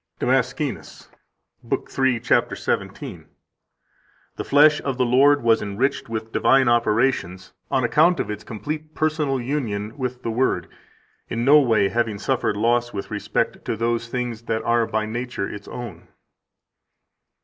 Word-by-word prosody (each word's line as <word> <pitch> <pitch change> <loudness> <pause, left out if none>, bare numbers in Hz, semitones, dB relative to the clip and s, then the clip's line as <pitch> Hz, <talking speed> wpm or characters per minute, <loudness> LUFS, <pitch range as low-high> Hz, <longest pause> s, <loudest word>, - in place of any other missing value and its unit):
161 130 +2 0
DAMASCENUS, - - -15 0.5
lib. - - -3
3, 130 -3 +1
cap. 125 - +1
17: - - -4 1.1
"The - - -4
flesh 150 +1 +5
of 135 -2 -3
the 130 - +2
Lord 140 +3 +4
was 115 -1 +3
enriched 105 +6 -2
with 110 0 -5
divine 135 +1 +3
operations 110 -5 +1 0.2
on 130 - +1
account 160 +8 +3
of - - -2
its 105 0 -6
complete 150 +7 -6
personal 155 -4 0
union 115 -5 -3
with 125 -1 -4
the 115 - -2
Word, 125 +4 0 0.6
in 115 +1 -2
no 145 +3 +7
way 110 -7 +3
having 115 -2 -1
suffered 120 -2 -1
loss 120 +2 +1
with 100 - -6
respect - - -2
to - - -1
those 115 0 -1
things 120 -2 -4
that 110 -1 -2
are 115 -1 +2
by 110 0 -1
nature 120 -2 -4
its 100 0 -9
own." 110 -9 -8
120 Hz, 150 wpm, -22 LUFS, 110-135 Hz, 1.1 s, no